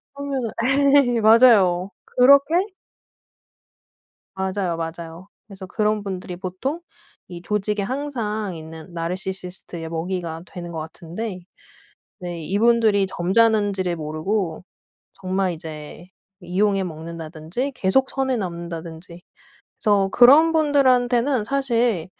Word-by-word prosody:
그러면은 275 -5 -3 0.7
예 - - 0
맞아요. 210 -5 +5 0.2
그렇게 280 +5 +5 1.8
맞아요, 190 -3 -2
맞아요. 165 +2 -7 0.2
그래서 195 -2 -10
그런 210 +1 -1
분들이 185 -2 -5
보통 190 - -4 0.5
이 175 -1 -9
조직에 210 +1 -1
항상 220 -7 -3
있는 160 +2 -10
나르시시스트의 180 -1 -5
먹이가 165 0 -4
되는 175 -2 -8
것 160 - -5
같은데 180 +5 -6 0.8
네 175 -2 -6
이분들이 215 0 +3
점잖은지를 195 -1 +1
모르고 160 +3 -3 0.5
정말 185 -1 -1
이제 155 +1 -9 0.4
이용해 195 +2 +1
먹는다든지 165 - -5
계속 250 +6 +2
선을 265 -2 0
넘는다든지 170 -1 -7 0.6
그래서 200 -2 +3
그런 290 +7 +7
분들한테는 260 -5 +2
사실 235 -8 0
190 Hz, 260 characters per minute, -22 LUFS, 170-230 Hz, 1.8 s, 그런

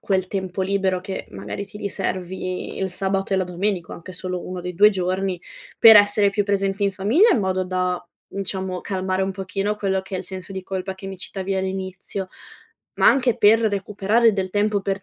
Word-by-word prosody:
quel 190 -2 0
tempo 190 -1 -3
libero 190 -1 0
che 190 +1 -6
magari 100 - -6
ti 205 - -12
riservi 185 -2 -4
il 190 - -1
sabato 195 +1 -1
e - - +2
la 190 - +1
domenica, 180 0 -2
o - - -5
anche 170 +2 -10
solo 180 0 -5
uno 180 -1 -5
dei 180 0 -5
2 205 +4 +7
giorni, 185 -1 -1 0.4
per 225 -1 +10
essere 205 0 +5
più 205 +1 +1
presenti 195 0 0
in 200 - +1
famiglia 220 - +4
in - - +2
modo 185 -1 0
da, 180 -1 -1 0.2
diciamo, 190 -2 -4
calmare 190 -1 -2
un 190 - 0
pochino 195 +2 -2
quello 195 -2 0
che 190 +1 -9
è - - -1
il - - -6
senso 190 0 -6
di 190 -1 -5
colpa 190 0 -4
che 195 +1 -10
mi 190 -1 -7
citavi 195 +1 -4
all'inizio, 190 0 -4 0.7
ma - - +3
anche 250 -3 +4
per 225 0 +5
recuperare 210 +2 +2
del 190 -2 -2
tempo 205 +1 +1
per 195 0 -3
190 Hz, 200 wpm, -22 LUFS, 185-200 Hz, 0.7 s, per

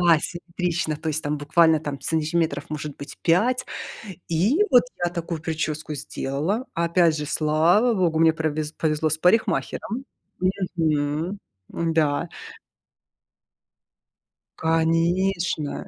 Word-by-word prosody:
да, 170 -2 +5
симметрично, 175 -1 -3
то 160 - -5
есть, 155 +1 -1
там 150 0 -1
буквально, 160 +2 +4
там, 145 -3 -5
сантиметров 160 -2 0
может 150 -1 -5
быть 145 - -10
5 240 +10 +2 0.7
и, 205 - +3
вот, 245 -1 +7 0.2
я 175 - -1
такую 170 -2 -4
причёску 155 -1 -3
сделала, 150 - -2
опять 170 -1 +3
же, 150 - -3
слава 165 +11 +3
богу, 175 -6 +1
мне 165 0 +6
провез 155 -1 -2
повезло 155 -1 0
с 155 - 0
парикмахером, 225 +5 +1 0.7
мгм, 155 +3 0 0.3
м-да. 160 -1 0 2.3
Конечно. 165 0 0
160 Hz, 110 wpm, -24 LUFS, 155-175 Hz, 2.3 s, вот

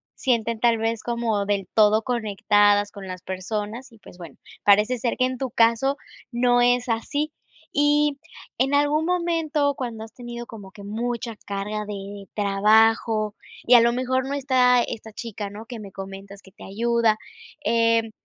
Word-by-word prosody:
sienten 230 -3 0
tal 235 -1 +3
vez 225 0 -2
como 230 -4 -1
del 200 -3 -1
todo 215 0 +5
conectadas 205 -3 +2
con 195 -2 -9
las 185 -1 -7
personas 210 +6 -5
y, 225 - -18
pues, 180 - -15
bueno, 170 - -11 0.3
parece 210 +5 +4
ser 240 0 -1
que 255 - +3
en 255 0 -3
tu 260 -1 -4
caso 230 +4 +3 0.4
no 245 0 +3
es 245 0 +2
así. 290 +7 -1 0.4
Y 290 0 +2 0.4
en 270 +2 +2
algún 290 +2 +2
momento, 330 -5 0
cuando 235 -4 -5
has 225 0 -12
tenido 240 -1 -8
como 205 -5 -11
que 200 -1 -12
mucha 230 +2 -3
carga 205 +1 -3
de 200 0 -7
trabajo 215 +1 +3 0.3
y 250 - +3
a 235 - +8
lo 235 0 +3
mejor 260 +1 -1
no 280 - -2
está 255 -3 +3
esta 220 0 -7
chica, 210 -2 -6
¿no?, 210 +3 -10
que 235 -1 -8
me 200 -2 -10
comentas 195 +1 -9
que 190 - -17
te - - -15
ayuda, 230 +1 +1 0.5
em, 230 -1 +2
230 Hz, 170 wpm, -24 LUFS, 205-250 Hz, 0.5 s, a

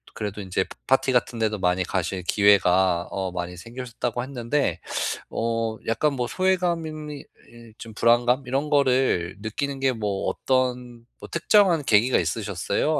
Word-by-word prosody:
그래도 105 -1 -4
인제 95 -1 -1 0.2
파티 135 0 +3
같은 120 -1 0
데도 110 -1 0
많이 90 0 +1
가실 95 0 -2
기회가 95 -3 +3
어 95 -2 -3
많이 90 0 -5
생기셨다고 120 +2 -5
했는데 125 - -1 0.9
어 110 0 -5
약간 145 +6 +1
뭐 125 -3 -2
소외감인 170 -4 -1
이 145 - -9 0.2
이 115 -2 -15
좀 115 -2 -10
불안감 120 +4 +3
이런 135 +4 -1
거를 130 - +2
느끼는 135 +6 -3
게 135 - +3
뭐 105 -5 -3
어떤 125 -2 -1
뭐 - - -9
특정한 170 -2 +3
계기가 120 +2 +4
있으셨어요? 140 - -1
120 Hz, 305 characters per minute, -24 LUFS, 100-135 Hz, 0.9 s, 계기가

